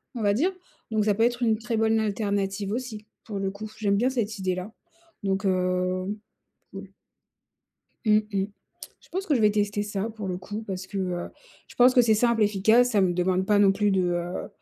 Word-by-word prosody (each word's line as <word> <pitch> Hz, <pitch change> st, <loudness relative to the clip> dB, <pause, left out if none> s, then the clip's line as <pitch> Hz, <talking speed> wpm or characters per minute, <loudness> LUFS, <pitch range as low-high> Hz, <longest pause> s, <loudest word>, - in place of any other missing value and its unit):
on 235 Hz, -, -4 dB
va 200 Hz, 0 st, +3 dB
dire. 325 Hz, -, +1 dB, 0.4 s
Donc 215 Hz, -1 st, +2 dB
ça 210 Hz, -, +3 dB
peut 225 Hz, -, +2 dB
être 240 Hz, +1 st, +1 dB
une 220 Hz, -2 st, +3 dB
très 235 Hz, +1 st, -3 dB
bonne 220 Hz, 0 st, +2 dB
alternative 200 Hz, -2 st, -1 dB
aussi 225 Hz, -3 st, -5 dB, 0.2 s
pour 205 Hz, -3 st, -5 dB
le 195 Hz, 0 st, -1 dB
coup. 215 Hz, +2 st, -8 dB
J'aime 200 Hz, -2 st, +2 dB
bien 250 Hz, +4 st, +2 dB
cette 220 Hz, -4 st, -2 dB
idée-là. 185 Hz, +2 st, -2 dB, 0.5 s
Donc, 195 Hz, +1 st, -1 dB
heu, 185 Hz, +1 st, 0 dB, 0.6 s
oui. 195 Hz, 0 st, -8 dB, 1.2 s
Mmh 215 Hz, -1 st, +5 dB
mh. 195 Hz, -1 st, +1 dB, 0.6 s
Je -, -, -22 dB
pense 380 Hz, +2 st, -3 dB
que 300 Hz, -, +2 dB
je 240 Hz, -, +1 dB
vais 210 Hz, -1 st, +5 dB
tester 205 Hz, 0 st, 0 dB
ça 210 Hz, +1 st, -3 dB
pour 215 Hz, -2 st, -7 dB
le 180 Hz, -, -2 dB
coup 205 Hz, +4 st, -6 dB
parce 190 Hz, -1 st, -5 dB
que, 200 Hz, 0 st, -5 dB
heu, 180 Hz, -2 st, -2 dB, 0.4 s
je -, -, -14 dB
pense 250 Hz, +1 st, +6 dB
que 245 Hz, -, +6 dB
c'est 225 Hz, -2 st, +4 dB
simple 230 Hz, 0 st, +2 dB
efficace, 220 Hz, +4 st, +4 dB
ça 210 Hz, -4 st, +3 dB
me 185 Hz, -2 st, +3 dB
demande 185 Hz, +1 st, 0 dB
pas 210 Hz, -1 st, +3 dB
non 195 Hz, -1 st, +5 dB
plus 205 Hz, +1 st, +1 dB
de, 190 Hz, -1 st, +2 dB
heu, 175 Hz, 0 st, -2 dB
205 Hz, 210 wpm, -26 LUFS, 190-220 Hz, 1.2 s, pense